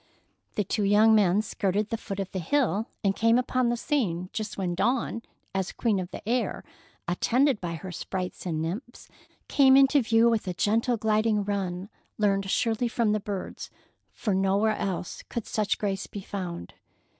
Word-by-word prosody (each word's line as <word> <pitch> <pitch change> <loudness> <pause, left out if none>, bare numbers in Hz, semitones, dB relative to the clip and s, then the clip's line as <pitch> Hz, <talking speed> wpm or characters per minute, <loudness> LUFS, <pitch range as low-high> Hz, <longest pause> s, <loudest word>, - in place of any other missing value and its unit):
The 210 - +1
two 205 +3 -2
young 210 +2 +5
men 205 -1 +4
skirted 200 0 -1
the - - -1
foot 200 -3 -6
of 195 -1 -3
the 190 - -3
hill 225 - +1 0.2
and 195 -1 +2
came 230 +1 +4
upon 255 -1 +1
the 240 - 0
scene 195 - -1
just 215 -1 -4
when 185 -3 -1
Dawn, 235 +3 0 0.3
as 190 -1 -1
queen 220 -5 0
of 180 -1 -4
the - - -9
air, 245 +2 0 0.4
attended 250 +8 +2
by 170 -2 -3
her 185 +3 -7
sprites 180 +1 -5
and 160 -2 -1
nymphs, 215 +10 -6 0.4
came 270 -2 +6
into 275 +1 +5
view 225 0 +4
with 225 -4 +1
a 180 - -2
gentle, 230 +5 +1
gliding 215 -1 +2
run 195 -2 -3 0.3
learned 195 -2 +1
surely 230 +3 +1
from 230 -2 +1
the 215 - +1
birds, 200 -2 -5 0.4
for 210 - -2
nowhere 195 +3 +2
else 185 -2 -3
could 235 - -4
such 210 -2 0
grace 195 -2 -2
be 205 - -7
found. 180 - -6
210 Hz, 175 wpm, -27 LUFS, 190-230 Hz, 0.4 s, came